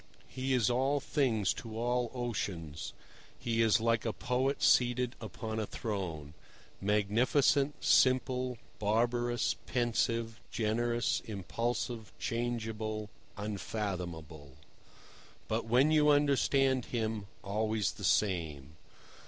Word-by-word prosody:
He 130 0 -2
is 115 -5 +3
all 135 +4 +2
things 120 - +1
to 110 -1 -8
all 120 +1 0
oceans; 90 - -3 0.5
he 115 -2 0
is 115 0 +4
like 115 0 +1
a 115 - 0
poet 130 +5 -1
seated 125 0 +3
upon 110 +1 -5
a 110 - -2
throne—magnificent, 105 - 0
simple, 130 -1 +3 0.2
barbarous, 120 +3 +1
pensive, 115 -2 0
generous, 120 +2 0
impulsive, 115 +2 -3
changeable, 110 -2 -3 0.3
unfathomable—but 90 - -6
when 125 +6 +4
you 150 -1 +5
understand 140 -3 +3
him, 110 -4 -2 0.2
always 110 0 0
the - - -11
same. 80 -7 0
115 Hz, 95 wpm, -32 LUFS, 105-125 Hz, 0.5 s, you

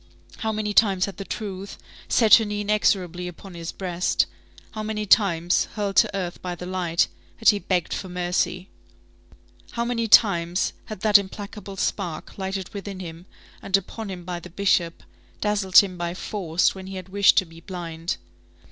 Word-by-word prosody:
How 220 - -1
many 215 -1 -2
times 195 -4 +4
had 200 - -8
the 195 - -6
truth 200 -2 -6 0.3
set 225 -3 +7
her 225 - 0
knee 205 0 -3
inexorably 185 -4 +1
upon 180 +2 -10
his 170 -1 -6
breast! 180 -1 0 0.5
How 215 - -5
many 215 0 -3
times, 175 -4 +3
hurled 200 -2 -2
to - - +4
earth 180 -2 -4
by 180 -1 -4
the 180 - -8
light, 180 -2 +1 0.3
had 225 - +5
he 205 - +4
begged 180 -4 -1
for 190 - -5
mercy! 180 +1 -1 1.1
How 235 0 -1
many 235 -1 -1
times 180 -4 +4
had 215 -4 -8
that 210 -1 +7
implacable 200 0 -8
spark, 175 -4 -3
lighted 190 -1 -3
within 200 -1 -6
him, 170 0 -9 0.3
and 195 0 +3
upon 205 +3 -7
him 180 -2 -7
by 175 -1 -4
the 180 - -11
Bishop, 175 -2 0 0.4
dazzled 205 -3 +1
him 185 -3 +6
by 175 0 -3
force 180 -4 0
when 190 -1 -9
he 190 - -7
had 185 0 -7
wished 200 +1 +4
to 190 - +4
be 165 0 -14
blind! 170 -2 -5
190 Hz, 175 wpm, -24 LUFS, 175-205 Hz, 1.1 s, set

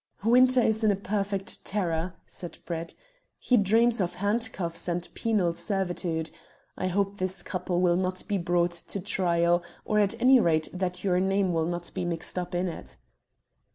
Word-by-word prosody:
"Winter 250 +3 +5
is 220 0 +1
a 210 -2 +4
perfect 200 +1 -1
terror," 175 -3 -1
said 175 - -9
Brett. 165 -1 -4 0.4
"He 250 - +2
dreams 225 +2 +3
of 175 -1 -2
handcuffs 200 -4 -1
and 175 0 -2
penal 205 -7 +1
servitude. 170 -2 -2 0.4
I 185 - -2
hope 200 +2 -1
this 185 0 -2
couple 180 -1 -2
will 175 -1 +3
not 185 0 -2
be 205 -2 0
brought 175 0 +1
to 175 +3 -5
trial, 175 -2 +2 0.2
or 210 - +2
at 210 +3 +1
any 255 +2 +6
rate 160 -6 +2
that 180 -1 -3
your 180 -2 +2
name 190 -1 +1
will 165 -1 +1
not 175 0 -4
be - - -3
mixed 175 +1 -3
up 180 0 -5
in 180 +1 0
it." 170 - -8
185 Hz, 165 wpm, -27 LUFS, 175-205 Hz, 0.4 s, any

